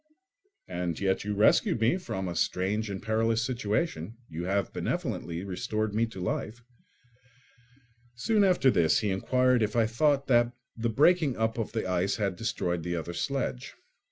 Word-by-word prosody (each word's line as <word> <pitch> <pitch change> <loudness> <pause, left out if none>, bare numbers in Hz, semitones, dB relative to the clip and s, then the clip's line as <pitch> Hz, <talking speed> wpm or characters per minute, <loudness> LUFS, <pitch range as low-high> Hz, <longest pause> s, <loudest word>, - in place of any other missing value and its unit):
"And 90 -2 -3
yet 95 -1 0
you 105 0 -2
rescued 105 +2 +3
me 115 +10 +3
from 95 - -4
a 85 - -4
strange 100 +6 0
and 95 -1 -5
perilous 115 +1 +1
situation; 120 +1 -2
you 85 +2 -5
have 100 +1 -1
benevolently 85 +1 -3
restored 110 +2 -2
me 115 +2 +1
to 105 -4 -10
life." 110 +6 -3 1.5
Soon 210 - +2
after 180 -9 +4
this 85 -6 +3
he 105 -3 0
inquired 125 +5 +2
if 105 0 0
I 115 -1 +4
thought 140 +5 +2
that 120 -2 +3 0.2
the 115 0 -1
breaking 145 +3 +3
up 110 +1 0
of 110 - -3
the 110 -4 -2
ice 90 +2 0
had 100 -4 -1
destroyed 90 -4 -2
the 85 +1 -3
other 85 +1 -4
sledge. 130 +3 -3
110 Hz, 160 wpm, -28 LUFS, 95-120 Hz, 1.5 s, after